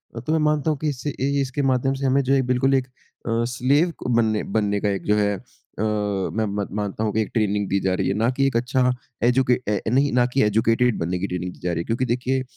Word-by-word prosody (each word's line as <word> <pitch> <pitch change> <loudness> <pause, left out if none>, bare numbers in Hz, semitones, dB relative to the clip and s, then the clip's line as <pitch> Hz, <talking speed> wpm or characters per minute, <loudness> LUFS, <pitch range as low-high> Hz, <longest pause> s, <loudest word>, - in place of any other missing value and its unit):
अ, - - -4
तो 140 +7 -4
मैं 160 - +2
मानता 150 +1 0
हूँ 150 - -2
कि 155 +1 0
इससे 140 +1 -4
ए 135 -1 -2
ए - - +2
इसके 135 +2 -2
माध्यम 130 +1 +1
से - - -1
हमें 135 +1 +3
जो 135 +2 +1
है 135 - +4
बिल्कुल 135 +2 +2
एक 125 - -15
अ, 115 -2 -5
स्लेव 145 +8 +2
क - - -4
बनने 110 -2 +1
बनने 105 -1 +1
का 105 - 0
एक 95 -3 -2
जो 105 - +3
है 105 -1 +2
अ, - - -14 0.4
मैं 105 0 -1 0.2
मत 100 - -3
मानता 105 +1 -3
हूँ 105 - -1
कि 110 - +2
एक 105 - -3
ट्रेनिंग 105 -3 0
दी 100 - +1
जा 95 -1 0
रही - - -1
है, - - +1
ना 110 +4 +1
कि 135 - +3
एक 135 - -2
अच्छा 125 +1 +1 0.3
एजुके 125 +1 +3
ऐ 105 -1 +1
नहीं, 135 +4 +2
ना 125 0 +4
कि 135 - +3
एजुकेटेड 115 +3 +2
बनने 90 +2 -2
की 100 - -2
ट्रेनिंग 90 -1 -4
दी - - -18
जा 90 - 0
रही 85 - -2
है। - - -4
क्योंकि 115 +3 -1
देखिए, 125 +2 -1
115 Hz, 270 wpm, -23 LUFS, 105-130 Hz, 0.4 s, है